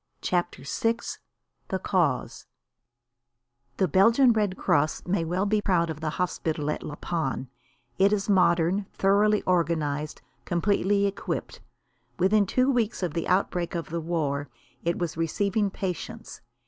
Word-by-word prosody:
CHAPTER 175 -4 -1
VI 225 +10 +1 0.7
THE 190 - -1
CAUSE 175 -9 -1 1.3
The 190 - +2
Belgian 230 - +5
Red 205 -4 0
Cross 150 +2 +1
may 180 -1 0
well 180 +4 -1
be 210 +1 +1
proud 170 -5 +1
of 155 - -7
the 160 - -1
hospital 160 -4 -1
at - - -4
La 150 - -6
Panne. 150 -6 -3 0.5
It 195 +1 +5
is 205 -1 0
modern, 180 0 +3
thoroughly 205 +2 +3
organised, 155 -4 0 0.2
completely 200 +3 +1
equipped. 200 0 -4 0.6
Within 200 +2 +3
two 255 +6 +2
weeks 230 -6 0
of 170 -4 -1
the 165 - -2
outbreak 180 -2 0
of 170 -1 -4
the 170 0 -2
war 145 -4 -2 0.3
it 170 +1 0
was 170 -3 -3
receiving 200 +5 0
patients. 185 -3 -6
180 Hz, 135 wpm, -26 LUFS, 165-200 Hz, 1.3 s, Belgian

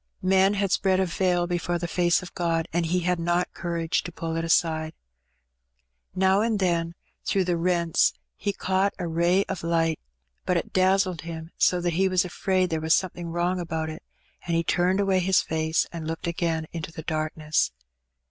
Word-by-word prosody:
Men 190 +2 +4
had 200 -2 0
spread 190 -1 +2
a 190 - +3
veil 175 0 +1
before 175 0 -1
the 170 0 -3
face 175 0 +2
of 180 - -10
Gt)d, 165 -2 0
an^ 170 0 +1
h^ 175 +2 0
had 180 0 +1
not 175 +1 0
courage 170 -1 -1
to 175 - -7
pull 165 -1 -4
it 165 - -1
aside. 160 -1 +1 1.2
Now 190 +2 +3
and 225 -1 +1
then 170 -3 0 0.3
through 195 - +1
the 175 -1 0
rents 170 -1 +2 0.2
he 205 - -2
caught 190 0 0
a 175 - -3
ray 170 +4 +2
of 190 -3 -5
light, 165 -1 +1 0.4
but 180 - +1
it - - -4
dazzled 185 -2 +2
him 165 0 -7
so 180 - +3
that 175 -1 0
he 190 +3 +2
was 185 0 +2
afraid 185 0 0
there 160 -1 -1
was 160 +1 +4
something 175 -2 -3
wrong 175 +2 -1
about 160 -2 -3
it, 155 - -9 0.5
and 170 - 0
he 165 - +2
turned 180 +3 +1
away 195 -2 +2
his 185 +1 +3
face 160 0 0
and 165 -2 -6
looked 165 +2 -4
again 165 -2 -1
into 165 -1 -5
the 160 -1 -8
darkness. 155 - -1
175 Hz, 190 wpm, -26 LUFS, 165-185 Hz, 1.2 s, Men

